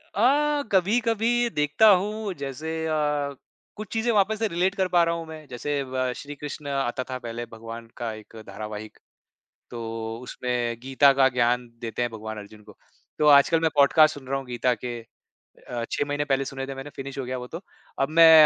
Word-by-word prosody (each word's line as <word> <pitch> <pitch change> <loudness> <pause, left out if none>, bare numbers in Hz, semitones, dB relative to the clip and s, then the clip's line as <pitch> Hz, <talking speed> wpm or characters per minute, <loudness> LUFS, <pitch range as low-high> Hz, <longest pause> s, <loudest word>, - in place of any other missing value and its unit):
अ, 290 +6 +3
कभी-कभी 230 +4 +2
देखता 150 +5 +3
हूँ, 205 +1 +2
जैसे 140 +1 -5 0.2
अ, 160 - 0 0.8
कुछ 215 0 -7
चीज़ें 230 +1 +1
वापस 210 +1 +2
से 225 - +2
रिलेट 185 +1 0
कर 190 -2 +1
पा 175 -1 +4
रहा 170 0 +1
हूँ 165 -1 -5
मैं। 155 -1 -9
जैसे 140 +3 -2
व 130 -1 -2
श्री 145 0 -8
कृष्ण 150 0 -7
आता 135 -2 -1
था 130 - -3
पहले, 120 0 -5
भगवान 115 0 -9
का 115 -2 -3
एक 110 +1 -12
धारावाहिक। 105 +1 -7 0.7
तो 115 -1 -5
उसमें 120 -2 -2
गीता 135 +2 +5
का 135 -1 +5
ज्ञान 125 0 +1
देते 115 0 -4
हैं 120 -1 0
भगवान 110 0 -6
अर्जुन 105 0 -11
को। - - -16 0.4
तो 150 - +4
आजकल 145 +3 +6
मैं 160 - +3
पॉडकास्ट 150 +2 +6
सुन 135 -2 -11
रहा 135 - 0
हूँ 135 - -6
गीता 125 +1 +1
के। 120 -1 -3 0.4
अ, 120 -1 -7
6 - - 0
महीने 145 0 0
पहले 135 -1 +1
सुने 135 0 -5
थे 135 - -5
मैंने, 135 +2 -7
फ़िनिश 135 0 -6
हो 135 - -2
गया 130 0 -3
वो 125 - -6
तो। 165 +7 -7 0.4
अब 135 - +2
मैं 165 +1 +8
135 Hz, 195 wpm, -25 LUFS, 120-170 Hz, 0.8 s, मैं